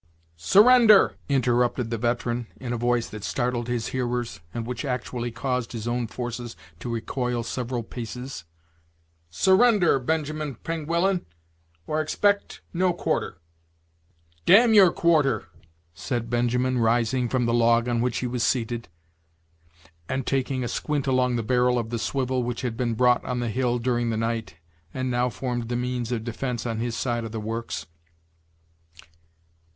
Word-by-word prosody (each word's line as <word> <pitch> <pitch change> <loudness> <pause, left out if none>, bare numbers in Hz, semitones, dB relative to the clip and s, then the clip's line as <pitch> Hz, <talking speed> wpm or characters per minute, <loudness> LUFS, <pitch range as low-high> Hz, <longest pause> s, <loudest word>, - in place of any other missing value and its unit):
"Surrender!" 215 - +6 0.2
interrupted 125 -2 +1
the 115 - -1
veteran, 120 0 -1
in 125 -2 -4
a - - 0
voice 120 0 +1
that 105 -2 -9
startled 120 -1 -1
his 120 -2 -2
hearers, 120 -5 -2
and 115 +4 -4
which 125 +4 -4
actually 125 -2 -3
caused 125 0 -3
his 115 -1 -5
own 120 0 -1
forces 120 -2 -5 0.2
to 120 - -5
recoil 120 +1 -2
several 120 0 -3
paces; 125 -1 -7 0.9
"surrender, 190 - +4
Benjamin 155 +1 -2
Pengullan, 170 - -1 0.6
or 155 0 0
expect 200 +6 0
no 180 0 +2
quarter.'" 170 - -2 1.1
"Damn 225 +5 +7
your 195 -5 +7
quarter!" 150 -9 +2 0.5
said 115 - -4
Benjamin, 125 +1 +1
rising 120 +2 +1
from 125 -1 +1
the 115 - +1
log 115 0 +3
on 120 -1 0
which 125 -1 0
he - - -2
was 125 0 -3
seated, 120 -1 0 1.2
and 130 -1 -2
taking 130 -1 -1
a - - -2
squint 145 +2 -2
along 130 -2 +2
the 115 - -1
barrel 125 +2 +2
of 115 -1 -3
the 115 - -2
swivel, 130 +1 -1
which 120 -1 -3
had 125 -3 -3
been 120 -1 -1
brought 125 +1 +3
on 125 -1 -3
the 120 -1 -1
hill 125 +1 0
during 120 -1 0
the 110 - -1
night, 115 -5 -2 0.4
and 130 0 -1
now 125 +1 +1
formed 120 -2 -4
the 120 - -1
means 125 -1 -2
of 115 -3 -2
defence 120 +1 -3
on 115 -2 -2
his 115 0 -2
side 120 -2 -1
of 115 - -6
the 110 - -4
works. 110 -5 -4
125 Hz, 155 wpm, -25 LUFS, 115-130 Hz, 1.2 s, Damn